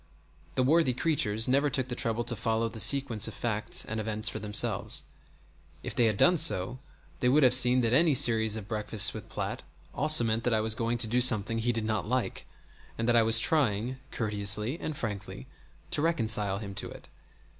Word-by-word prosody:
The 130 - +1
worthy 155 -1 +2
creatures 120 -7 0
never 140 +3 +1
took 130 -2 -2
the 125 - -6
trouble 115 0 -2
to 120 0 -2
follow 115 +1 -2
the 115 - -9
sequence 115 -1 +2
of - - -9
facts 110 -3 -2
and 110 +1 -5
events 110 +1 -2
for - - -6
themselves. 105 -1 +1 0.8
If - - -5
they 120 -2 +1
had 110 -3 0
done 180 - +3
so 130 - +1 0.4
they 125 - +1
would 145 +3 +3
have 125 -1 +4
seen 125 0 +4
that 115 -1 -1
any 155 +1 +3
series 110 -3 +3
of 105 -3 -8
breakfasts 110 -1 +1
with - - -10
Platt - - -5 0.3
always 155 +3 +3
meant 115 0 -1
that 120 -2 +1
I - - +1
was 110 0 +1
going 115 +1 -2
to 115 -1 +1
do 125 +3 0
something 115 -2 +4
he 120 +2 0
did 115 -2 -4
not 110 -1 -3
like, 130 0 -3 0.5
and 115 - -3
that 120 - +2
I 115 - +5
was 115 0 +4
trying, 125 -1 0
courteously 105 - 0
and 155 -2 -6
frankly, 105 -4 -7 0.5
to - - +2
reconcile 110 -11 0
him 100 -1 -8
to - - -5
it. - - -13
115 Hz, 200 wpm, -28 LUFS, 110-130 Hz, 0.8 s, I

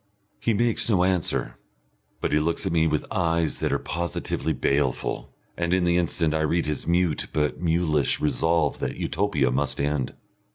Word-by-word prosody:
He 115 - +1
makes 120 +1 +1
no 95 -5 +3
answer, 90 -2 0 0.6
but - - -1
he 75 - +4
looks 85 +2 0
at - - 0
me 80 -1 +3
with 75 -1 0
eyes 85 -3 0
that - - 0
are - - +2
positively 85 -2 -3
baleful, 70 -2 -1 0.2
and 85 +1 +1
in 95 - +1
the 85 0 +3
instant 85 -2 +1
I 80 - 0
read 80 +2 +1
his 75 -1 -3
mute 85 -2 +1
but 75 -1 0
mulish 80 -5 +1
resolve 80 +4 +1
that - - -3
Utopia 75 -8 0
must 65 0 -1
end. 70 -2 -1
80 Hz, 170 wpm, -25 LUFS, 75-85 Hz, 0.6 s, he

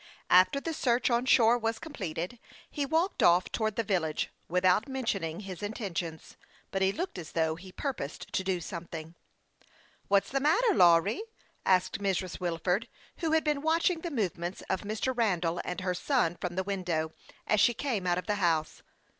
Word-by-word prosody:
After 185 +10 +6
the 325 +3 -4
search 250 -4 +1
on 240 +2 +1
shore 235 -1 +5
was 225 0 -1
completed, 195 - -5 0.3
he 285 -2 -2
walked 325 +6 +1
off 175 +1 +4
towards 220 -2 -1
the 230 - 0
village 175 -7 -1 0.2
without 180 - +2
mention 240 -8 -1
ing 165 +3 -4
his 190 -2 -7
intentions, 185 -7 -5 0.3
but 195 - -1
he 190 0 +4
looked 340 - -4
as 170 -1 -9
though 160 -1 +1
he 185 +3 -11
pur 275 +7 -2
posed 140 - -7
to 190 - 0
do 190 -1 0
something. 165 -1 -7 0.9
"What's 200 0 +2
the 275 - +1
matter, 400 - +3
Lawry?" 175 - +5 0.5
asked 185 0 +3
Mrs. 190 -2 -1
Wil 175 -2 -1
ford, 180 +6 0 0.3
who 325 -3 -1
had 320 - +3
been 295 -2 0
watching 325 +2 +2
the 345 - -3
movements 185 - -3
of 190 - 0
Mr. 215 +5 -2
Randall 180 -7 +1
and 180 +1 -4
her 185 -1 0
son 180 - +1
from 175 -1 -3
the 190 - 0
window, 180 -5 -2 0.3
as 215 - +2
she 240 +3 +4
came 220 -10 -2
out 175 0 +2
.of 180 - -3
the 210 - 0
house. 160 -3 +1
195 Hz, 185 wpm, -30 LUFS, 175-245 Hz, 0.9 s, After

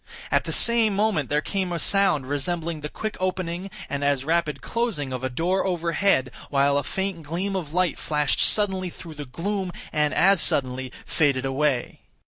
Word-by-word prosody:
At - - +2
the - - -3
same 230 -3 +5
moment 200 - +1
there 150 +1 +1
came 190 -3 -2
a 170 - -1
sound 165 -6 +2
resembling 160 +3 -2
the 150 - -5
quick 215 +6 -5
opening, 185 0 -2 0.2
and 140 0 -3
as 140 -2 +1
rapid 160 -3 0
closing 185 - -2
of 130 0 -5
a 130 - 0
door 175 +9 0
overhead, 170 -6 +1 0.2
while 140 0 +3
a - - -4
faint 190 -3 -3
gleam 175 +6 -3
of 165 -6 -4
light 180 0 0
flashed 150 -1 0
suddenly 190 -3 +2
through 165 -1 -10
the 145 -1 -7
gloom, 185 +8 -3 0.2
and 150 -1 +2
as 195 -2 +5
suddenly 130 -1 +1
faded 140 -4 +1
away. 135 -1 -1
165 Hz, 175 wpm, -24 LUFS, 145-190 Hz, 0.2 s, same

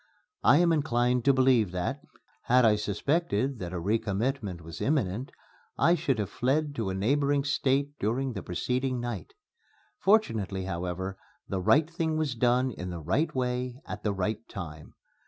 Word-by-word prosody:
I - - +6
am 170 0 +4
inclined 125 -5 +1
to 140 - +7
believe 130 -6 +4
that, 90 -1 -2 0.4
had 125 0 +5
I 110 -1 +5
suspected 125 - 0
that 90 -2 -5
a - - -5
recommitment 105 0 -1
was 80 0 -9
imminent, 130 -4 0 0.5
I 170 - +4
should 145 -7 0
have 100 -2 -3
fled 145 +4 0
to 110 -4 -1
a 95 - -2
neighboring 140 +7 +2
State 140 0 +1
during 125 +5 -1
the 100 - -5
preceding 125 +9 -1
night. 120 - -5 0.6
Fortunately, 110 - +2
however, 95 +1 -4 0.3
the 95 -2 -2
right 150 - +4
thing 165 -1 -1
was 155 -4 0
done 125 +2 +2
in 90 -4 -6
the 90 - -5
right 95 - 0
way 125 0 -2
at 105 - -6
the 105 - 0
right 100 +2 -1
time. 80 -5 -8
120 Hz, 160 wpm, -28 LUFS, 95-140 Hz, 0.6 s, to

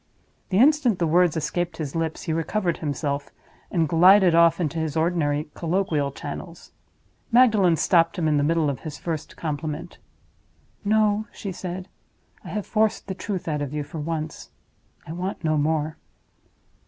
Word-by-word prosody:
The 190 - +1
instant 265 - +4
the 175 - +1
words 170 0 +3
escaped 170 +1 -2
his 150 -2 -5
lips 165 -1 -2
he 160 - -2
recovered 170 +2 -1
himself, 145 -1 -3 0.4
and 165 -4 +1
glided 180 +3 +6
off 170 0 +5
into 165 -1 -1
his 160 -1 -2
ordinary 155 -3 0
colloquial 165 -5 0
channels. 165 +5 -8 0.6
Magdalen 220 -8 +5
stopped 165 +2 +2
him 165 -3 0
in 150 -1 +2
the 145 - +2
middle 160 0 +2
of 140 -4 -2
his 150 -2 -7
first 160 -3 -5
compliment. 155 +2 -4 0.8
"No," 215 0 +2
she 200 - -6
said; 185 +1 -6 0.6
"I - - -11
have 205 +4 -3
forced 215 -1 +1
the 190 - -4
truth 190 -1 -5
out 150 -2 -1
of 145 +1 -4
you 150 - -1
for 160 +3 -8
once. 155 0 -4 0.6
I - - -8
want 180 +2 -4
no 155 -1 +2
more." 155 +1 0
165 Hz, 160 wpm, -24 LUFS, 155-185 Hz, 0.8 s, glided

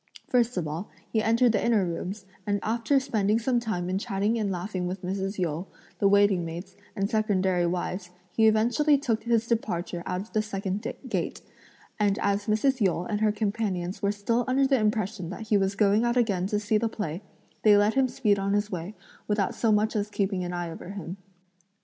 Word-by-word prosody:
First 245 -2 +2
of 170 -4 -1
all, 160 +6 -5 0.2
he 220 - +3
entered 230 +2 +4
the 215 - 0
inner 225 -5 +3
rooms, 185 +4 -4 0.2
and 205 0 +1
after 230 +5 +2
spending 220 -5 +1
some 240 +1 +1
time 215 -7 -2
in 185 +1 0
chatting 205 0 0
and 205 -2 0
laughing 180 0 -3
with 185 +1 -5
Mrs. 195 +2 -3
Yu, 175 0 -2 0.3
the 200 - +4
waiting 200 -2 +4
maids, 165 +3 -7 0.2
and 195 -2 0
secondary 190 -5 +1
wives, 180 +1 -3 0.2
he 220 -1 +4
eventually 240 +7 +4
took 235 -6 -1
his 235 -1 +2
departure 185 -7 -2
out 180 0 -1
of 210 - -12
the 215 - +2
second 200 -1 -3 0.2
gate; - - -2 0.6
and 205 -1 +2
as 200 +1 0
Mrs. 245 +4 +2
Yu 185 -4 +2
and 205 +4 -3
her 215 -1 +4
companions 200 -4 -2
were 200 - +2
still 230 +4 0
under 265 +2 +3
the 270 -1 +3
impression 210 -4 -1
that 215 +3 -7
he 210 - +4
was 195 0 0
going 205 +2 +3
out 240 +1 +1
again 200 -6 +1
to 210 +1 0
see 210 +1 +1
the 230 +1 0
play, 190 -5 -4 0.4
they 210 -1 +6
let 205 +2 +3
him 270 -1 +3
speed 215 -6 +1
on 195 +1 0
his 205 +1 0
way, 180 +3 -5 0.3
without 205 -2 +1
so 225 - +1
much 215 +1 +2
as 205 0 -1
keeping 195 -3 -1
an 175 - -3
eye 175 -1 -3
over 165 - -9
him. 195 -2 -6
205 Hz, 205 wpm, -27 LUFS, 190-225 Hz, 0.6 s, they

